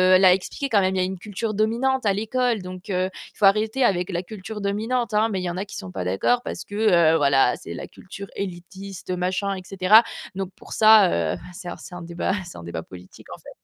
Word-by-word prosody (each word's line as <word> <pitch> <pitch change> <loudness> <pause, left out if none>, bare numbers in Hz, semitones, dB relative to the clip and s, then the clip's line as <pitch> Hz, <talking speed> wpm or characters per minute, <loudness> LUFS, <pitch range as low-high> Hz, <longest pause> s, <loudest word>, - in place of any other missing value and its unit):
heu, - - +8
l'a 185 -1 +6
expliqué 195 +9 -3
quand 220 -5 +4
même, 190 0 +1
il - - 0
y - - +3
a - - +2
une 190 0 -5
culture 210 +2 -4
dominante 235 +5 +1
à 200 - +3
l'école, 225 +2 0
donc 185 +2 -9
heu, 185 -1 0
il - - -13
faut - - -6
arrêter 215 +6 +3
avec 180 -5 +1
la 175 -1 -2
culture 210 +2 -8
dominante, 220 +3 -1
hein, 215 +1 +3
mais 195 -4 -2
il - - -5
y 180 - -2
en 175 - -4
qui 205 - -10
sont 95 - -7
pas 90 -1 -4
d'accord 95 - +1
parce - - -5
que, 205 - -10
heu, 170 -7 +4
voilà, 140 -4 +3
c'est 85 - -8
la - - -7
culture 195 +1 -10
élitiste, 190 0 -7
machin, 185 +2 -1
et 185 - -7
cetera, 195 +3 +6 0.3
donc 190 -1 -4
pour - - -16
ça, 215 -4 +7 0.2
heu, - - -5 0.2
c'est 180 -1 -8
c'est 180 - -10
un 175 - -7
débat 170 +2 -2
c'est 175 - -10
un - - -9
débat 85 -1 -5
politique 90 0 -14
en - - -17
fait. - - -13
195 Hz, 245 wpm, -23 LUFS, 180-215 Hz, 0.3 s, heu